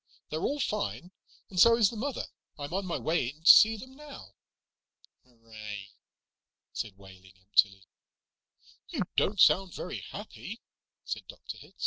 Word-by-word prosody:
"They're 155 +1 -2
all 290 +1 -1
fine, 210 -6 -2 0.4
and 185 - -4
so 230 +4 +7
is 215 -4 +4
the - - -8
mother. 260 +4 -3 0.3
I'm 145 +2 -6
on 195 0 -2
my 170 - -1
way 160 -5 0
in 150 +4 -13
to - - -2
see 220 +3 +9
them 260 +5 -11
now." 295 0 -12 0.9
"Hooray," 110 -4 -10 0.8
said 105 -4 -5
Wehling 95 -1 -16
emptily. 95 0 +2 1.0
"You - - -1
don't 205 0 +1
sound 185 0 +5
very 180 - -5
happy," 210 +2 -9 0.4
said - - -5
Dr. - - -9
Hitz. - - -17
170 Hz, 145 wpm, -29 LUFS, -, 1.0 s, see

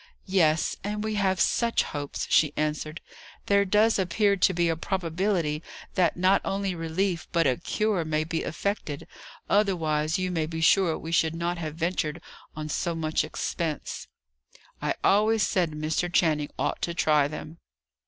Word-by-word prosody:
"Yes, 165 -5 +2
and 210 +1 -3
we 220 0 -2
have 190 -3 +1
such 235 +5 +2
hopes!" 145 -1 -4
she 150 -2 +3
answered. 155 +2 -2 0.4
"There 200 0 +4
does 210 +3 +3
appear 200 +3 +2
to 190 0 +3
be 175 -1 +1
a 165 - +1
probability 170 -2 -1 0.3
that 175 -3 +2
not 185 +2 +4
only 195 -1 -1
relief, 170 +1 -2
but 170 -1 +2
a 130 -3 +2
cure, 210 -5 0
may 155 0 0
be 165 +1 -2
effected; 165 -4 -3 0.4
otherwise, 160 -7 +1
you 185 0 -1
may 160 -3 -1
be 160 0 -5
sure 165 0 +4
we 165 - -7
should 165 -1 +2
not 170 +1 -2
have 155 -2 -5
ventured 165 -1 -1 0.4
on 155 0 -5
so 170 +2 -2
much 155 -1 0
expense." 155 0 -4 0.7
"I - - 0
always 215 +2 +4
said 180 -3 +1
Mr. 155 +3 -2
Channing 155 -4 +2
ought - - -1
to 170 - -2
try 150 -4 +3
them." 155 +2 -8
170 Hz, 160 wpm, -27 LUFS, 155-195 Hz, 0.7 s, There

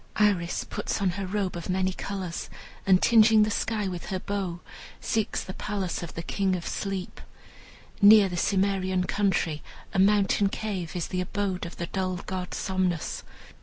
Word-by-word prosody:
Iris 195 -5 +2
puts - - -3
on 195 -2 +2
her 195 +1 -4
robe 195 -1 -1
of 170 +1 -6
many 185 0 +1
colors, 185 -3 -5 0.4
and 185 -1 +6
tingeing 220 -1 +6
the 215 - 0
sky 215 -1 -1
with 180 -2 -5
her 190 - -2
bow, 185 -3 -3 0.4
seeks 220 -2 -1
the 190 - -7
palace 195 -4 -3
of 170 - -7
the 165 - -4
King 190 +1 0
of 175 - -5
Sleep. 195 -2 -4 0.8
Near 205 0 +8
the 180 - -4
Cimmerian 190 0 +1
country, 180 -6 0 0.3
a - - +1
mountain 200 0 +4
cave 195 -6 -4
is 175 - -2
the 185 -1 -1
abode 190 -2 -2
of 170 - -11
the 170 - -2
dull 185 0 -2
god 185 -1 -4
Somnus. 185 -4 -1
190 Hz, 165 wpm, -27 LUFS, 180-200 Hz, 0.8 s, Near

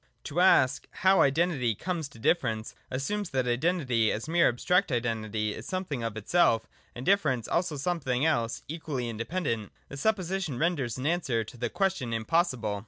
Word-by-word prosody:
To 155 - -3
ask, 130 -9 +4
' - - -47
How 190 +1 +6
Identity 140 -6 +2
comes 170 - -3
to 130 - -16
Difference,' 115 -3 0 0.2
assumes 185 +10 -2
that 130 -1 0
Identity 125 -4 +1
as 110 +6 -4
mere 170 +1 +4
abstract 175 +8 +1
Identity 110 -3 -1
is - - -8
something 185 -9 -3
of 115 -2 -3
itself, 115 - +2 0.3
and 125 - -7
Difference 150 - +2
also 170 -3 0
something 140 -4 0
else 120 -8 0
equally 145 -5 -4
inde 115 0 -5
pendent. 115 - -2 0.2
This 140 0 -7
supposition 190 - 0
renders 140 -7 0
an 130 - -5
answer 145 -9 0
to 110 - -12
the 120 0 -2
question 190 - -1
impossible. 115 - 0
135 Hz, 170 wpm, -28 LUFS, 115-175 Hz, 0.3 s, How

